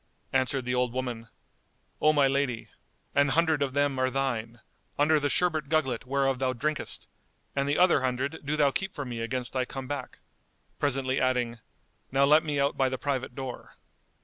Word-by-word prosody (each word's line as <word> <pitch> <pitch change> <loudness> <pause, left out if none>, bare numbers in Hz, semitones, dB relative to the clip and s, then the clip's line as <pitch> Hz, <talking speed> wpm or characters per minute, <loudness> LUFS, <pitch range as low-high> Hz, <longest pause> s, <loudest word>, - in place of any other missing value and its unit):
Answered 130 0 +1
the 125 - -1
old 125 -1 +1
woman, 125 -3 -4 0.7
"O 155 - +6
my 145 -3 +4
lady, 135 -4 -1 0.4
an 140 0 +4
hundred 160 0 +2
of 135 -1 -1
them 145 -2 +1
are 130 0 +2
thine, 120 -4 -2 0.4
under 150 +1 +4
the 145 0 0
sherbet 160 -5 +1
gugglet 135 -7 0
whereof 135 -1 +1
thou 130 -1 +1
drinkest,[FN#205] 150 +5 -3 0.5
and 140 0 0
the 145 - +2
other 180 -6 +5
hundred 130 +4 -1
do 150 +2 -1
thou 145 -2 +4
keep 195 +7 -3
for 145 - -4
me 120 -2 -5
against 125 +2 -2
I 130 -1 +1
come 135 +1 -6
back," 145 +1 -5 0.6
presently 135 -2 0
adding, 125 -2 0 0.5
"Now 135 +1 +4
let 150 +3 +6
me 150 -2 -1
out 140 0 +2
by 135 -1 +2
the 130 - -3
private 130 -2 -2
door." 130 -2 -7
135 Hz, 180 wpm, -28 LUFS, 130-145 Hz, 0.7 s, O